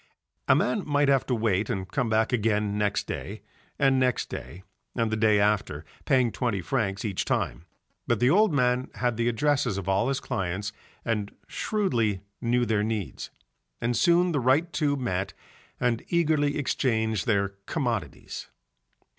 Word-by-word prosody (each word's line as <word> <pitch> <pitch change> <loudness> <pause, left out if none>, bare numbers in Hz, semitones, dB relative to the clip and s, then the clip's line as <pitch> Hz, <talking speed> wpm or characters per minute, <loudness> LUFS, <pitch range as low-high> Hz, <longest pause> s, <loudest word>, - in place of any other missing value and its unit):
A - - +6
man 215 - +1
might 145 -1 +2
have 135 -2 +3
to 125 - +1
wait 110 -3 0
and 95 -1 -2
come 120 +5 -1
back 110 +2 +2
again 105 -3 +1
next 105 -1 0
day, 100 +1 -6 0.3
and 135 -2 +3
next 125 -2 +1
day 90 +3 -7 0.3
and 115 -2 0
the - - +1
day 110 -1 +3
after, 100 -7 0 0.2
paying 130 -4 +3
twenty 115 -6 -1
francs 100 0 -1
each 100 -4 -1
time, 80 - -2 0.4
but 120 -3 +1
the 125 +4 +4
old 210 +2 +5
man 125 -2 +1
had 120 -2 0
the 115 +1 0
addresses 125 -3 +1
of 100 - -5
all 95 +4 +2
his 135 0 0
clients 100 -4 -3 0.3
and 105 -3 -1 0.2
shrewdly 120 - 0 0.2
knew 120 0 +2
their 110 -2 +1
needs, 110 -4 -3 0.5
and 120 +1 0
soon 175 +3 +4
the 145 - +1
right 140 +7 +2
two 150 -2 +1
met 95 -7 -2 0.4
and 120 -2 0
eagerly 155 -4 +2
exchanged 110 - 0
their 100 -3 +2 0.2
commodities. 115 - -3
115 Hz, 160 wpm, -27 LUFS, 105-135 Hz, 0.5 s, A